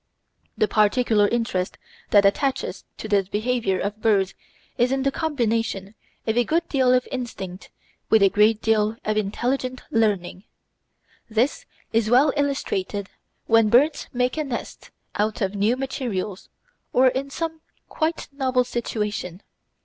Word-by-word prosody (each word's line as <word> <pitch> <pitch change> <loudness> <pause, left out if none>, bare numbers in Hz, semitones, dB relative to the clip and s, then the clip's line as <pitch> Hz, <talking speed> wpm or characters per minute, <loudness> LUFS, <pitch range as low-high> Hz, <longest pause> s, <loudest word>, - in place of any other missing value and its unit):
The 215 - +3
particular 215 0 +3
interest 205 -5 -1 0.3
that 200 -1 +5
attaches 265 +7 0
to - - -6
the 200 -3 +2
behaviour 220 -3 0
of 210 +2 -3
birds 200 -4 +2 0.4
is 245 +2 +2
in 270 0 0
the 275 - +2
combination 230 -10 -1 0.3
of 220 - 0
a 245 - +4
good 330 +6 0
deal 260 -3 +3
of 250 0 +2
instinct 200 -7 -6 0.4
with 220 -2 +5
a 195 - +6
great 210 +2 +3
deal 220 0 +2
of 215 - 0
intelligent 250 +5 -1
learning. 205 -4 0 0.8
This 230 +5 0 0.3
is 225 -1 +2
well 270 +4 +5
illustrated 205 -9 -2 0.3
when 225 -1 +4
birds 285 +7 +3
make 250 +3 0
a 310 - 0
nest 260 -5 -6 0.2
out 210 +1 -1
of 195 -3 -1
new 210 +5 +1
materials 225 -8 -4 0.4
or 255 +1 +6
in 265 +2 -3
some 320 +2 -4 0.3
quite 320 +1 -2
novel 260 -2 +1
situation. 210 -6 -3
225 Hz, 140 wpm, -23 LUFS, 205-255 Hz, 0.8 s, a